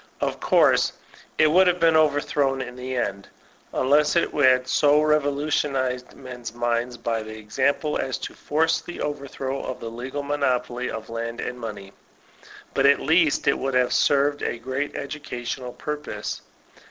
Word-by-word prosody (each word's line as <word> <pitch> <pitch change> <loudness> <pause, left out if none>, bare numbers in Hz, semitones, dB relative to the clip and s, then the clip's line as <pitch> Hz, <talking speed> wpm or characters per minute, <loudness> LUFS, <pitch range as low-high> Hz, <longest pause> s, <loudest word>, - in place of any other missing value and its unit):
Of - - -2
course, - - +3 0.4
it 155 - +5
would 180 +5 +5
have 180 0 +2
been 165 -1 +4
overthrown 145 -3 +2
in 125 -1 -6
the 130 +1 -5
end, 100 -5 -2 0.4
unless 150 +4 +3
it 170 - +2
had 130 -3 +4
so 145 +2 +4
revolutionized 145 -4 0
men's 125 -3 -8
minds 120 +1 -1
by 115 -1 -2
the 110 0 -8
example 135 +8 0
as 130 - -2
to - - -7
force 160 +2 0
the 175 - -9
overthrow 140 -2 -4
of - - -5
the 115 - -6
legal 130 +5 -5
monopoly 125 -4 -1
of 110 0 -7
land 115 +1 -4
and 125 0 -4
money; 105 -4 -7 0.8
but 135 - +4
at 140 - +5
least 160 0 +2
it 140 - +3
would 135 0 -2
have 125 -1 +3
served 145 0 +2
a - - -2
great 130 +4 -3
educational 130 -3 -5
purpose. 150 0 -5
135 Hz, 155 wpm, -24 LUFS, 120-145 Hz, 0.8 s, it